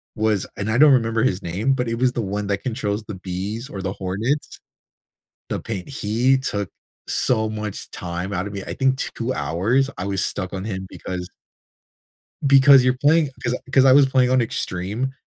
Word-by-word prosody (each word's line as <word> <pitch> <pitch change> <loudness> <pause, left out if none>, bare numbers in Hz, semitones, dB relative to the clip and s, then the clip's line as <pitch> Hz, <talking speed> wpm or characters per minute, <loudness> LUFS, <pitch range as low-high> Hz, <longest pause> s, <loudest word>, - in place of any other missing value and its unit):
was 110 -3 +1
and 100 +1 -3
I 115 - +1
don't 150 +2 +7
remember 115 -2 +2
his 95 -7 +1
name- 100 +11 0
but 125 -2 -1
it 115 - -1
was 125 -1 +3
the 120 - -1
one 100 0 -3
that 100 -1 -2
controls 110 -4 -2
the 105 - -6
bees 95 +6 -5
or 95 - -6
the 95 +1 -3
hornets. 105 +11 -3 0.9
The - - -2
Pain 100 -5 -5
he 130 +1 +1
took 100 -7 -3 0.4
so 110 -3 +1
much 105 -2 -5
time 90 +2 -5
out 95 +1 -2
of 105 - -8
me. 100 -1 -5
I - - -5
think 135 0 +1 0.2
2 120 +2 -2
hours, 120 +12 +1
I 90 - -4
was 100 -1 -1
stuck 95 -2 -3
on 95 0 -4
him 95 -3 -4
because 90 -1 -6 1.2
because 135 -1 +7
you're 125 0 +3
playing 150 +3 +3
'cause 120 +1 0 0.2
'cause 135 - +6
I 130 - +7
was 140 0 +7
playing 130 -1 +3
on 130 0 +3
extreme, 110 +4 -3
110 Hz, 190 wpm, -22 LUFS, 95-130 Hz, 1.2 s, don't